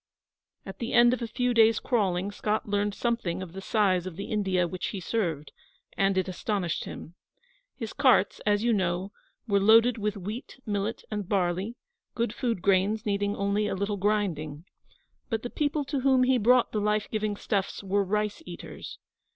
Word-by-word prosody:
At 195 - -9
the 235 - -3
end 240 0 +6
of 255 - -3
a 235 - -2
few 245 +2 0
days' 225 -1 +5
crawling 200 -5 0
Scott 210 +1 -2
learned 205 0 0
something 190 -7 -1
of 175 -2 -10
the 195 - -7
size 190 -4 +1
of 180 - -7
the 200 +5 -6
India 190 -4 +1
which 180 +1 -4
he 200 - -4
served; 170 -7 -2 0.4
and 195 -1 +2
it 185 - +1
astonished 185 -1 -2
him. 165 - -8 0.6
His 225 -5 -6
carts, 270 -4 +3
as 205 0 +2
you 235 -1 +3
know, 185 -1 -1 0.4
were 200 -2 +3
loaded 225 +3 +5
with 210 0 -1
wheat, 215 +8 -7
millet, 205 +1 -2
and 210 -3 -4
barley, 190 +3 0 0.4
good 235 -2 -1
food 230 -8 -2
grains 200 +3 +2
needing 205 0 0
only 200 +1 0
a 200 - -2
little 200 +2 -2
grinding. 180 -7 -1 0.6
But 225 -3 -2
the 245 - -5
people 295 -1 -1
to 280 0 -2
whom 260 -1 +4
he 255 0 +3
brought 245 +3 +4
the 210 - -1
life 210 0 +1
giving 215 -1 -1
stuffs 200 -1 -2
were 200 +1 +1
rice 210 - -1
eaters. - - -9
205 Hz, 180 wpm, -27 LUFS, 190-230 Hz, 0.6 s, end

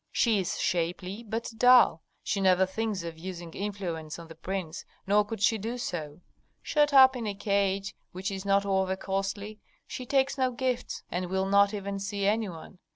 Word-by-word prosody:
"She 225 -4 +2
is 185 - -2
shapely, 180 +4 -1
but 225 +1 -4
dull; 245 -9 +6 0.2
she 200 - -1
never 190 0 +4
thinks 205 -1 -3
of 165 -1 -7
using 175 -2 -7
influence 180 -6 -4
on 165 -1 -11
the - - -9
prince, 170 0 -5 0.2
nor 205 +2 +4
could 205 0 -5
she 220 0 +3
do 230 +4 -4
so. 160 -8 -5 0.4
Shut 295 -1 +2
up 265 -1 +8
in 235 -3 -3
a 205 - -3
cage 200 -1 0 0.2
which 190 +3 -4
is 190 -1 -5
not 200 0 +2
over 190 -1 +1
costly, 195 +2 -3 0.3
she 255 - -7
takes 275 +1 +1
no 260 -1 +3
gifts, 250 0 -2
and 180 0 -2
will 190 +1 0
not 200 +1 +4
even 200 -1 -4
see 200 0 -3
any 215 +1 +1
one. 175 +2 -11
195 Hz, 185 wpm, -28 LUFS, 185-220 Hz, 0.4 s, up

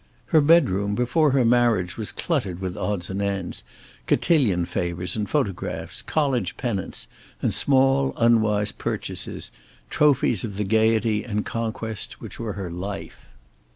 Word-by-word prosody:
Her 155 - +7
bedroom 105 - +3
before 145 +6 +2
her 130 -2 +3
marriage 115 -6 +3
was 110 -2 -2
cluttered 115 - -2
with 95 -2 -4
odds 95 -3 -2
and 95 +1 -2
ends, 100 -3 -3 0.4
cotillion 110 - +3
favors 90 0 -2
and 105 -2 -2
photographs, 105 -12 -2
college 135 - 0
pennants 105 -7 -3 0.3
and - - 0
small 135 0 +3
unwise 110 -3 +3
purchases - - -4 0.4
trophies 140 -8 +3
of 105 -4 -5
the 105 - 0
gayety 110 +1 +2
and 105 -3 -2
conquest 110 -2 -4
which - - -9
were 110 -3 -3
her 95 -3 -5
life. 95 -4 -7
110 Hz, 135 wpm, -24 LUFS, 95-125 Hz, 0.4 s, Her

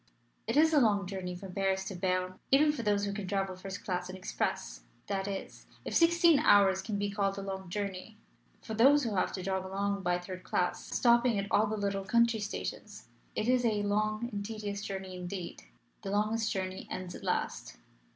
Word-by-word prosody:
It - - 0
is 320 +1 +5
a 300 - +6
long 205 -4 +3
journey 180 -1 -5
from 185 0 -9
Paris 190 0 0
to 195 - -5
Berne 185 0 -1
even 295 +3 +5
for 295 -5 -4
those 205 -2 +1
who 200 - -2
can 200 -2 -5
travel 195 -1 -1
first 195 +2 -8
class 180 -2 -2
and 185 - -6
express 180 - -3 0.2
that 195 -1 -2
is, 195 -1 -6 0.2
if - - -4
sixteen 335 -2 +5
hours 195 -8 +5
can 205 +1 -3
be 205 0 -1
called 200 -1 0
a 195 - -4
long 190 -2 -5
journey. 200 +2 -4 0.5
For 220 - -6
those 275 +6 +5
who 230 -3 -1
have 185 - +1
to 185 - -4
jog 190 0 -1
along 200 +1 -2
by 175 -1 +1
third 185 +1 -7
class, - - -1
stopping 235 -2 +4
at 200 - -1
all 215 +1 +4
the 215 +1 -2
little 200 -1 -1
country 235 +2 +3
stations, 205 -1 -6 0.3
it 215 - -1
is 250 0 +3
a 215 -3 +1
long 215 +2 0
and 205 0 -3
tedious 205 -2 -4
journey 190 -2 -5
indeed. 180 - -6 0.4
The - - -5
longest 215 +2 +1
journey 190 -1 -4
ends 185 -1 -5
at - - -10
last. - - -2
200 Hz, 200 wpm, -31 LUFS, 190-215 Hz, 0.5 s, a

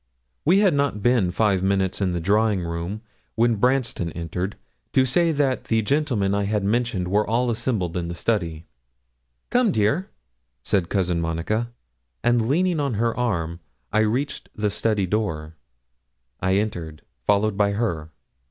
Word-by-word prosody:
We 185 +6 +5
had 195 -5 +4
not 140 -8 0
been 120 -7 +3
five 95 0 +2
minutes 95 0 0
in 95 -2 +1
the 90 - -1
drawing 100 +2 +2
room 85 +5 -4 0.3
when 115 -1 +3
Branston 125 -7 +1
entered, 90 +4 -4 0.4
to 130 - +4
say 170 +6 +2
that 140 -4 0
the 110 -1 +1
gentlemen 120 -7 +1
I 100 0 +1
had 105 0 0
mentioned 105 -3 0
were 105 +3 +1
all 120 +3 +1
assembled 110 -7 -1
in 85 -1 -2
the 85 - -5
study. 85 -5 -1 0.9
'Come, 245 -4 +3
dear,' 125 - +1 0.5
said 95 -5 +1
Cousin 90 -4 0
Monica; 85 +8 -1 0.5
and 120 -1 +2
leaning 175 +2 +2
on 140 -5 0
her 115 +2 0
arm 85 -9 -1 0.3
I 110 - +4
reached 120 +7 -1
the 105 -1 0
study 105 -3 +1
door. 85 -6 -2 0.9
I 95 +1 +1
entered, 85 -7 -3 0.2
followed 105 0 +3
by 100 0 +2
her. 85 -8 -2
105 Hz, 150 wpm, -23 LUFS, 90-120 Hz, 0.9 s, We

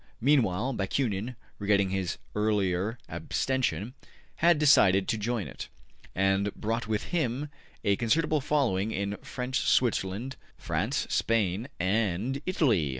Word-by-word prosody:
Meanwhile 125 -3 +2
Bakunin, 110 +2 -1 0.2
regretting 100 -2 +2
his 95 -3 -2 0.2
earlier 105 0 0
abstention, 105 +5 -1 0.4
had 170 -1 +4
decided 100 -11 +5
to 110 - 0
join 115 -1 -1
it, - - -8 0.5
and 95 +1 +2
he - - -2
brought 115 +1 -2
with 110 -1 -2
him 145 -3 -1 0.3
a 100 -1 +2
considerable 155 +6 +1
following 120 -9 +1
in 100 0 -2
French 125 +1 -3
Switzerland, 120 +1 +1 0.2
France, - - -1
Spain 110 0 +1
and 105 +7 0
Italy. 120 - +2
110 Hz, 120 wpm, -28 LUFS, 95-130 Hz, 0.5 s, decided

